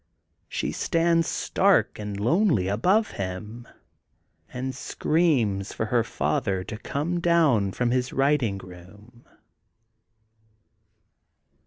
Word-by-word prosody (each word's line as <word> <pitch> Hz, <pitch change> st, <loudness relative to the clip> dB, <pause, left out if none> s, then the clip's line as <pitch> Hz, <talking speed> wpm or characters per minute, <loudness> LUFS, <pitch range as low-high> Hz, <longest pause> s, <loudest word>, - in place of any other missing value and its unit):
She -, -, -2 dB
stands 165 Hz, -1 st, +1 dB
stark -, -, +1 dB
and 105 Hz, -1 st, -5 dB
lonely 150 Hz, -, +2 dB
above 185 Hz, -, +2 dB
him, 100 Hz, +5 st, -6 dB, 0.8 s
and 130 Hz, +1 st, -4 dB
screams 125 Hz, -, 0 dB
for 110 Hz, -, -2 dB
her 115 Hz, +1 st, +1 dB
father 90 Hz, +2 st, -1 dB
to 105 Hz, -, -7 dB
come 160 Hz, +8 st, -2 dB
down 155 Hz, -, +3 dB
from 120 Hz, +4 st, -1 dB
his 125 Hz, 0 st, 0 dB
writing 135 Hz, -7 st, +1 dB
room. 95 Hz, +6 st, -14 dB
120 Hz, 100 wpm, -25 LUFS, 100-155 Hz, 0.8 s, down